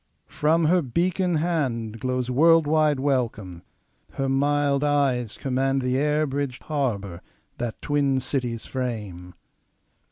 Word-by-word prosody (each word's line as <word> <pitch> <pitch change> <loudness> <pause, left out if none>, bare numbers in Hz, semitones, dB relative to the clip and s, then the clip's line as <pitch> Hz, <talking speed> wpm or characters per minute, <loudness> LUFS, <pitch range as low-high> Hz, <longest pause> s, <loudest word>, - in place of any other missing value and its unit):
From 160 +2 +2
her 180 +3 +4
beacon 175 +5 0
handGlows 125 -6 -2
world 165 +4 +5
wide 150 -2 +2
welcome; 115 -10 -2 0.5
her 135 - -2
mild 140 +1 +1
eyes 135 -6 +1
commandThe 135 -1 0
air 150 +3 +1
bridged 135 -2 -4
harbour 100 - -2 0.4
that 120 -2 -4
twin 140 -2 +1
cities 125 -4 -3
frame. 105 -9 -5
135 Hz, 105 wpm, -24 LUFS, 120-150 Hz, 0.5 s, world